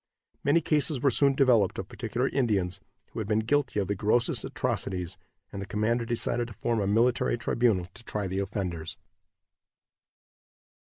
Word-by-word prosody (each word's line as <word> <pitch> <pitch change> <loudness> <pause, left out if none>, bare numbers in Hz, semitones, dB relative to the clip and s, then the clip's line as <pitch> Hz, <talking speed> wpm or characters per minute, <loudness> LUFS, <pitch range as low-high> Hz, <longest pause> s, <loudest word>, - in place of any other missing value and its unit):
Many 150 +4 +4
cases 150 -3 +1
were 135 +2 +3
soon 140 +2 +3
developed 125 -8 +3
of 95 - -4
particular 120 +4 -2
Indians, 105 -10 0 0.3
who - - -6
had 110 - -3
been 110 0 +2
guilty 125 -1 +1
of 100 - -1
the 100 - 0
grossest 110 +4 +1
atrocities, 90 -3 -3 0.4
and 100 - -6
the - - -4
commander 115 +3 0
decided 120 0 0
to 120 - -10
form 115 +1 -1
a 100 - 0
military 115 +3 +2
tribunal 115 -6 +1
to - - -9
try 105 -3 -3
the 95 +1 -2
offenders. 95 -5 -4
115 Hz, 160 wpm, -28 LUFS, 100-125 Hz, 0.4 s, Many